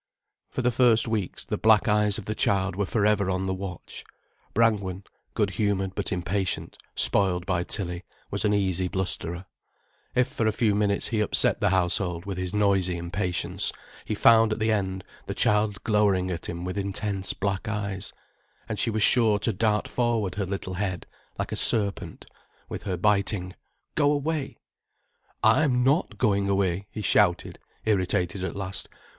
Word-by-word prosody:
For 130 - -3
the 125 - +3
first 120 -2 +4
weeks, 110 -5 -3
the - - -3
black 110 -1 +4
eyes 105 -1 +3
of 110 - -7
the 110 - -2
child 95 -3 +1
were 100 0 -1
for 105 -3 +1
ever 105 -2 +2
on 95 0 -1
the 95 - -1
watch. 95 -2 -7 0.5
Brangwen, 100 -4 +1 0.3
good 105 -2 +1
humoured 95 -1 -1
but - - -3
impatient, 90 +2 -2 0.2
spoiled 90 -3 +2
by 90 -2 0
Tilly, 90 -2 -2 0.3
was - - 0
an 105 - +2
easy 95 -3 +1
blusterer. 90 -1 -2 0.7
If 125 -1 +3
for 110 - -1
a - - +3
few 110 -1 +1
minutes 100 -1 +1
he 110 - 0
upset 105 - +2
the 105 - +3
household 90 -1 0
with 95 -2 -4
his 90 -1 -3
noisy 95 -4 +1
impatience, 90 +1 -1 0.3
he 105 - -3
found 115 +1 +5
at 110 - -1
the 110 0 +1
end 95 -3 -1 0.2
the - - -4
child 105 -1 +2
glowering 100 -4 +2
at 85 -1 -5
him 85 +1 -5
with 90 +2 -3
intense 100 0 -3
black 100 +2 -2
eyes, 100 -3 -3 0.6
and - - -4
she - - +1
was 110 -1 +1
sure 110 -3 +5
to 110 +2 -1
dart 105 +1 +1
forward 115 -5 0
her 100 -2 -3
little 95 -1 -4
head, 90 -2 -3 0.3
like - - -3
a - - -2
serpent, 100 -3 -1 0.4
with - - -6
her 95 -3 -2
biting: 100 -1 +1 0.4
"Go 145 -1 +3
away." 150 0 -2 0.9
"I'm 130 -5 +4
not 135 - +1
going 100 -1 +1
away," 95 -1 0
he 105 - -6
shouted, 90 -1 +2 0.3
irritated 95 -3 0
at 95 - -3
last. 100 -1 -3
100 Hz, 170 wpm, -26 LUFS, 95-110 Hz, 0.9 s, found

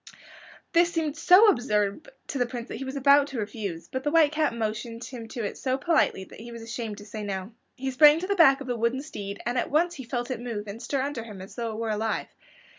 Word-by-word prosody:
This 345 0 +4
seemed 320 -3 -1
so 360 +6 +7
absurd 210 - +1 0.2
to 275 - -4
the 245 - +2
Prince 240 -1 -6
that - - -5
he 265 - -5
was 265 +1 -5
about 280 +1 +5
to 270 -4 -5
refuse, 205 -5 -5
but 260 0 -4
the 295 - +1
White 310 -1 +5
Cat 310 -1 +1
motioned 230 +1 -4
him 235 -3 -8
to 235 +1 -5
it 205 - -4
so 260 -1 0
politely 285 - +2
that - - -13
he 235 +2 -9
was 230 -1 -8
ashamed 225 -2 -5
to 205 - -11
say 215 +1 -7
no. 195 0 -4 0.2
He 265 0 -3
sprang 295 +4 +7
to 365 - -3
the 400 - +1
back 280 -7 +6
of - - -5
the 245 - -1
wooden 235 +4 0
steed, 200 -8 -7
and 245 +1 0
at - - -2
once 340 +4 +2
he 270 - -7
felt 240 +1 -3
it 250 - -3
move 230 -4 -4
and 210 +3 -7
stir 260 +2 -1
under 280 -5 -3
him 210 -4 -10
as 190 +1 -10
though 230 -2 -3
it - - -6
were 225 -1 -2
alive. 220 +1 -2
240 Hz, 260 wpm, -27 LUFS, 220-285 Hz, 0.2 s, so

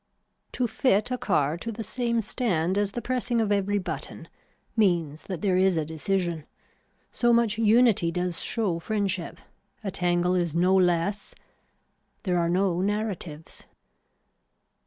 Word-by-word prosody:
To 250 - 0
fit 235 0 +1
a 250 - 0
car 155 -4 +1
to 230 +6 -5
the 225 +1 -5
same 235 -1 -1
stand 190 -6 -1
as 200 0 0
the 240 - -4
pressing 245 -2 0
of 215 -2 +1
every 205 0 +1
button 190 - -6 0.5
means 170 -8 +1
that 185 -4 -5
there 190 -3 +2
is 185 -2 +3
a 155 - 0
decision. 165 0 -2 0.6
So 240 -1 +2
much 230 -2 +2
unity 220 -5 +4
does 180 0 -2
show 200 -8 -1
friendship. 195 -2 -2 0.5
A 195 - -3
tangle 180 -1 +1
is 175 -3 0
no 180 +2 +3
less. 180 +2 +1 0.9
There 180 -3 +1
are 170 0 +1
no 180 0 +1
narratives. 195 -6 -4
190 Hz, 140 wpm, -26 LUFS, 175-220 Hz, 0.9 s, unity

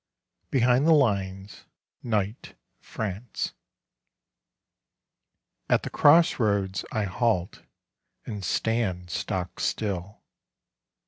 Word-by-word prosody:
BEHIND 125 +2 +3
THE 165 - +7
LINES: 100 -7 -1 0.4
NIGHT, 110 -1 -2 0.2
FRANCE 105 +2 -5 2.2
At - - +3
the - - -5
cross 165 +3 +5
roads 100 -4 0
I 110 - 0
halt 100 -2 -1 0.6
And 105 -4 -6
stand 95 -2 -1
stock 90 +4 -3
still.... 100 -2 -3
105 Hz, 80 wpm, -26 LUFS, 95-120 Hz, 2.2 s, THE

